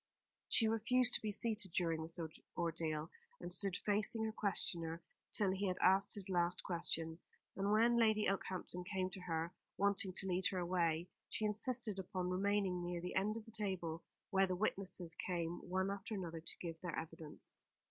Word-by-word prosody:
She 225 - +5
refused 240 +3 +3
to - - +1
be 215 - -1
seated 215 -3 0
during 165 -3 +1
this 165 +2 -3 0.4
ordeal, 165 -2 -1 0.3
and 175 0 -3
stood 185 0 +4
facing 210 +2 +2
her 220 - 0
questioner 170 -6 -1 0.3
till 200 -3 +4
he 195 +1 0
had 185 0 0
asked 195 +2 +5
his 200 -3 -1
last 175 -2 +1
question; 165 -2 -1 0.4
and 200 +1 +1
when 230 +3 +5
Lady 215 -2 +4
Okehampton 185 -2 -2
came 185 0 -1
to 190 - -7
her, 165 -1 -2 0.2
wanting 200 -1 +2
to 195 - +2
lead 185 0 +2
her 190 - -2
away, 170 -2 +1 0.2
she 215 - -1
insisted 215 -1 0
upon 180 -1 -2
remaining 195 -1 +1
near 175 0 -2
the 180 +1 -4
end 210 +3 +1
of 220 - -7
the 225 - -12
table, 185 -6 -2 0.3
where 195 -1 +4
the 185 - 0
witnesses 185 -3 -1
came 170 -1 -2
one 190 +2 +1
after 200 +2 -4
another 170 -4 -4
to - - -7
give 165 -2 -5
their 175 -3 -3
evidence. 160 -1 -6
185 Hz, 180 wpm, -39 LUFS, 170-205 Hz, 0.4 s, She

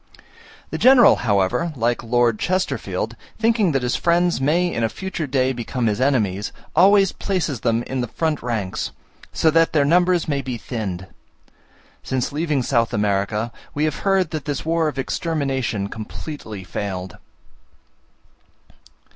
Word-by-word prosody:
The - - -3
general, 255 -1 +7
however, 105 - +1
like 120 -1 0
Lord 120 -1 +1
Chesterfield, 185 +1 -1 0.2
thinking 220 -5 +2
that 135 -3 0
his 125 - 0
friends 175 -3 +2
may 160 +6 +2
in 115 - -1
a 115 - +2
future 190 -2 -4
day 130 0 +1
become 120 0 -3
his 110 +2 0
enemies, 105 -8 +1 0.2
always 195 0 +5
places 165 - -2
them 115 0 0
in 130 0 -3
the 120 - -2
front 155 +5 -1
ranks, 110 -6 -2 0.4
so 160 - +2
that 165 +1 +3
their 145 -3 +3
numbers 175 +2 +3
may 140 -2 0
be 130 -2 -4
thinned. 100 -7 -5 1.0
Since 130 -2 -2
leaving 150 -3 0
South 115 -1 +1
America 105 +2 0 0.2
we 150 - 0
have 155 -2 0
heard 190 -4 +1
that 155 -4 -4
this 145 0 -3
war 165 0 +1
of 150 - -4
extermination 135 - -1
completely 110 -1 -7
failed. 95 0 -5
135 Hz, 145 wpm, -21 LUFS, 115-165 Hz, 1.0 s, general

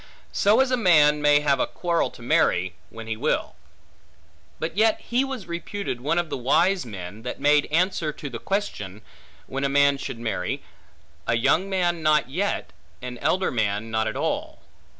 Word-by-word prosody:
So 215 +5 +4
as 265 -1 +1
a 255 - +3
man 150 -8 +5
may 145 0 +5
have 140 -2 +2
a - - +1
quarrel 170 -2 0
to 120 - -14
marry, 95 -5 +2 0.2
when 115 0 -9
he 110 -1 -3
will. - - -1 1.0
But 160 +1 -4
yet 220 +1 +3
he 245 +3 0
was 265 -7 -5
reputed 170 -4 -4
one 155 +6 0
of 175 -2 -1
the - - -3
wise 175 +6 +2
men, 100 0 -8
that 125 - -6
made 145 +1 +3
answer 165 -1 +1
to 150 - -8
the 120 -4 -6
question, 110 - -3 0.4
when 135 +1 -4
a 140 - +1
man 140 0 +3
should 130 - -5
marry, 110 -6 -3 0.6
A 115 - +2
young 150 +11 +2
man 175 -3 0
not 150 -3 +2
yet, 195 +7 -2 0.3
an 125 -1 -6
elder 185 +8 +1
man 110 -1 -1
not 110 0 0
at 110 - -3
all. - - -3
150 Hz, 180 wpm, -24 LUFS, 115-180 Hz, 1.0 s, man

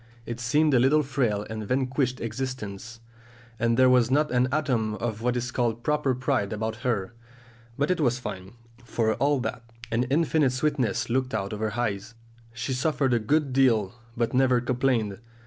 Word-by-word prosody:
It 120 0 -5
seemed 145 +6 +2
a 125 - +5
little 145 +5 +4
frail 120 -7 -1
and 110 -1 -5
vanquished 130 0 0
existence, 115 -2 -5 0.6
and 115 0 +2
there 130 0 +6
was 125 -2 +4
not 150 +2 +2
an 125 0 +3
atom 125 -8 0
of 110 +1 -4
what 125 +1 0
is 120 0 -3
called 120 -2 -1
proper 150 -3 +1
pride 125 -5 0
about 110 +1 -3
her; 115 -3 -2 0.6
but 145 +5 +1
it 180 - 0
was 125 -3 +2
fine, 95 -6 -7 0.3
for 115 -2 0
all 145 +2 +1
that! 120 - -4 0.3
An 115 +2 +1
infinite 150 -1 +2
sweetness 130 -4 0
looked 130 -1 0
out 100 0 -2
of 105 - -5
her 110 0 -2
eyes; 110 -1 -2 0.4
she 115 +3 -3
suffered 135 0 +1
a 120 - +3
good 140 +4 +1
deal, 120 -7 +3 0.2
but 115 -1 0
never 130 -1 +4
complained. 120 -5 0
125 Hz, 175 wpm, -26 LUFS, 110-135 Hz, 0.6 s, there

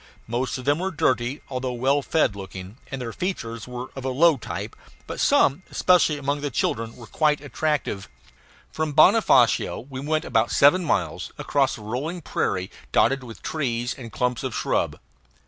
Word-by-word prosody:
Most 120 +4 -2
of 130 - -8
them 145 +2 +2
were 190 +2 -1
dirty, 130 -4 0
although 130 -1 -3
well 135 +4 +2
fed 140 -7 +1
looking, 95 +1 -8
and 135 - -5
their 115 -3 -5
features 115 - -4
were 125 +1 -6
of 135 - -6
a 135 - -1
low 155 +5 +5
type; 125 - -6 0.3
but - - -6
some, 140 +7 +3
especially 175 -4 +3
among 145 +1 -2
the 145 - -2
children, 115 -2 -1
were 120 - -11
quite 150 +5 +1
attractive. 145 -8 -2 0.6
From 155 -1 -2
Bonofacio 155 - +4
we 130 - -5
went 155 +3 -1
about - - +2
seven 145 +6 +5
miles, 100 - -1
across - - +1
a - - -12
rolling 135 +11 -4
prairie 95 -8 -1 0.2
dotted 135 +3 +3
with 115 -5 -11
trees 120 -6 -1
and 120 -4 -10
clumps 125 -1 -1
of 130 -3 -4
shrub. - - 0
130 Hz, 170 wpm, -24 LUFS, 120-150 Hz, 0.6 s, low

